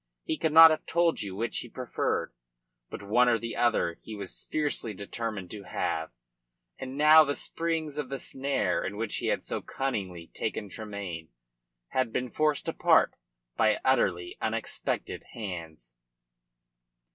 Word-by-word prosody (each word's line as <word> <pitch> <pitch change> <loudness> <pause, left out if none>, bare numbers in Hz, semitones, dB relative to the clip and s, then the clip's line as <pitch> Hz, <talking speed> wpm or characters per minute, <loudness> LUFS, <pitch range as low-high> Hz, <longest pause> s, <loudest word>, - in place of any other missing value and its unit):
He - - -1
could 160 0 0
not 160 +1 +10
have 155 - -2
told 170 -1 +2
you 100 -2 -4
which 115 +4 -2
he 120 - -8
preferred. 125 +1 -2 0.6
But - - -7
one 120 +5 +4
or 115 - +4
the 115 0 -5
other 95 -8 +1
he 110 - -8
was 100 -3 -6
fiercely 145 -8 -1
determined 100 -2 -5
to 105 - -7
have, 80 -2 -2 0.7
and 130 +1 -6
now 155 +2 +8
the 145 -1 -1
springs 160 -3 -2
of 135 -4 -3
the 135 - -3
snare 135 +2 -1
in 100 +2 -4
which 115 -1 -2
he - - -2
had - - 0
so - - -3
cunningly 95 -11 -4
taken 105 - -3
Tremayne 100 -7 -6 0.6
had 130 -3 0
been 125 0 -2
forced 155 -2 +1
apart - - +4 0.4
by 110 -1 +3
utterly 95 -9 +1
unexpected - - -2
hands. 80 - -7
115 Hz, 150 wpm, -29 LUFS, 100-140 Hz, 0.7 s, not